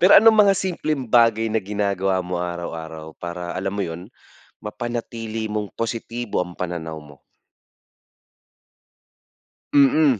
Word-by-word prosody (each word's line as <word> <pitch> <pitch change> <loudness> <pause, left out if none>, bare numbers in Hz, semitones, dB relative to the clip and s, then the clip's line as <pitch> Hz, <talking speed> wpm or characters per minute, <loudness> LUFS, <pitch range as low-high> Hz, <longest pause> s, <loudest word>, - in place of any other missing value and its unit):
Pero 185 +3 +7
anong 220 0 +6
mga 195 - +5
simpleng 155 -8 -1
bagay 115 -1 +4
na 110 0 +1
ginagawa 100 -2 0
mo 90 -1 -3
araw-araw, 80 -2 -6
para 85 0 -5
alam 95 +2 -2
mo 100 - -1
yun 85 +2 -7 0.5
mapanatili 115 0 -4
mong 105 -1 -3
positibo 115 -2 -2
ang 90 -1 -8
pananaw 80 -3 -4
mo? 75 -2 -14 2.6
Mm, 140 -3 +5
105 Hz, 120 wpm, -23 LUFS, 90-120 Hz, 2.6 s, Pero